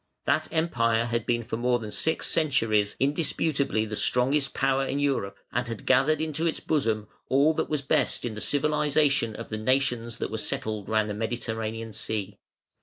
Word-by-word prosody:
That 155 - +2
Empire 115 -9 +1
had 120 -1 -2
been 120 -1 +1
for 110 0 -4
more 125 +1 +2
than 110 -3 -7
six 160 +8 -1
centuries 115 -10 +2
indisputably 140 -4 +1
the 110 0 -5
strongest 135 +6 +2
power 135 0 +1
in 135 - -2
Europe, 135 -9 0
and 120 +1 -1
had 115 -2 -6
gathered 135 +4 +4
into 160 +1 -1
its 160 - -1
bosom 110 -9 0 0.2
all 140 +4 +4
that - - -2
was 150 -2 -1
best 135 - +1
in 120 - -3
the 105 - -6
civilisation 150 -4 +2
of 115 - -7
the 110 - -3
nations 120 -1 0
that - - -3
were 110 - -2
settled 110 -3 -3
round 110 -1 +2
the 105 - -3
Mediterranean 115 0 -3
Sea. 105 -2 -4
120 Hz, 180 wpm, -27 LUFS, 110-145 Hz, 0.2 s, gathered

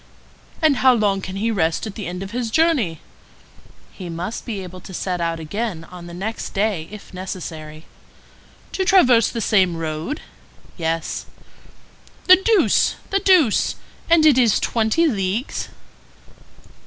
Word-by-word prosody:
"And 300 -4 +4
how 260 -1 +5
long 200 -3 +1
can 190 0 -6
he 220 +4 0
rest 165 -4 0
at 215 - -6
the 210 -4 -6
end 180 +2 -5
of 195 - -8
his 240 -1 -2
journey?" 260 - +1 0.9
"He 180 -2 -8
must 175 +9 -5
be 205 -5 -4
able 185 0 -10
to 190 - -10
set 180 -1 -2
out 165 -1 -1
again 180 +2 -4
on 175 -1 -10
the 170 - -9
next 215 +5 -5
day 195 -6 0
if 210 -1 -12
necessary." 160 -4 -7 0.9
"To 380 - -1
traverse 255 - +5
the 230 - -4
same 185 -5 +2
road?" 160 - -4 0.5
"Yes." 165 -1 -3 1.0
"The 370 0 +8
deuce! 420 +2 +3 0.2
the 395 - +2
deuce! 355 - +3 0.3
And 330 -2 +5
it 285 -5 +6
is 230 -5 +4
twenty 230 +9 +1
leagues?" 210 - -2
200 Hz, 145 wpm, -21 LUFS, 175-245 Hz, 1.0 s, The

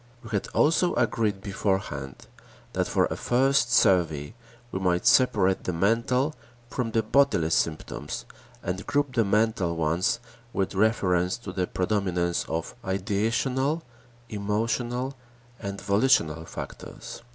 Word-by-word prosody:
We 115 - -10
had 100 -3 -1
also 165 +3 +2
agreed 110 -4 +1
beforehand 95 -9 -3 0.5
that - - 0
for - - +2
a - - -3
first 130 0 +2
survey 85 - +3 0.4
we 95 - -2
might 90 -2 +1
separate 95 -7 +4
the 90 - -1
mental 115 - +1 0.4
from 120 0 -1
the 115 0 +1
bodily 110 - +3
symptoms 75 -2 -2 0.4
and 90 +3 -4
group 145 -2 0
the 115 - +3
mental 105 -4 +1
ones 85 +5 +1 0.3
with 95 0 -1
reference 95 -3 +2
to 115 -5 -7
the 90 -1 -1
predominance 90 -3 0
of 80 +1 -3
ideational, 115 - 0 0.4
emotional, 115 +5 -1 0.5
and 100 -2 -4
volitional 100 - +2
factors. - - -8
100 Hz, 120 wpm, -26 LUFS, 90-120 Hz, 0.5 s, separate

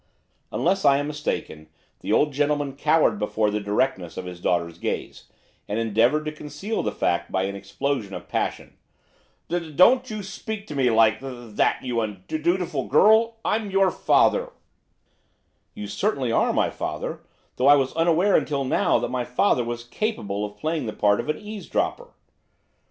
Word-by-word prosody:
Unless 190 +3 +1
I 140 -1 +5
am 145 - -1
mistaken 145 - -4 0.3
the - - -4
old 150 -1 +3
gentleman 145 -1 0
cowered 155 +3 +2
before 105 0 0
the 105 - -1
directness 100 -3 -1
of 90 - -5
his 90 -1 -8
daughter's 85 -2 -1
gaze, - - -4 0.4
and 105 - -2
endeavoured 115 +7 +2
to 155 - -2
conceal 155 +8 -4
the - - -2
fact 85 0 -1
by 95 - 0
an 100 +1 -3
explosion 100 +2 -3
of - - -8
passion. - - -3 0.7
'Do 170 -2 -3
don't 250 - +5
you 215 - -4
s 190 - -9
speak 210 +1 -6
to 150 - -8
me 135 -2 +1
li - - +4
like 110 -1 +4
that, 120 -5 -2
you 120 -2 -1
un 105 -4 -5
undutiful 160 -3 -1
girl! 220 - +5
I 215 - +2
I'm 215 -2 -5
your 195 -1 +3
father!' - - +2 1.2
'You 210 -1 -6
certainly 140 - -1
are - - +2
my - - +1
father; - - -4 0.4
though 130 - +2
I 145 - +9
was 135 -2 0
unaware 170 +4 +3
until 140 -2 +1
now 130 - +2
that - - -2
my 125 -1 -1
father 125 +2 +1
was 120 0 -5
capable 120 - -3
of 105 0 -6
playing 155 -1 -2
the 110 - -4
part 105 0 +2
of - - -4
eavesdropper. 210 - -3
140 Hz, 175 wpm, -24 LUFS, 110-175 Hz, 1.2 s, I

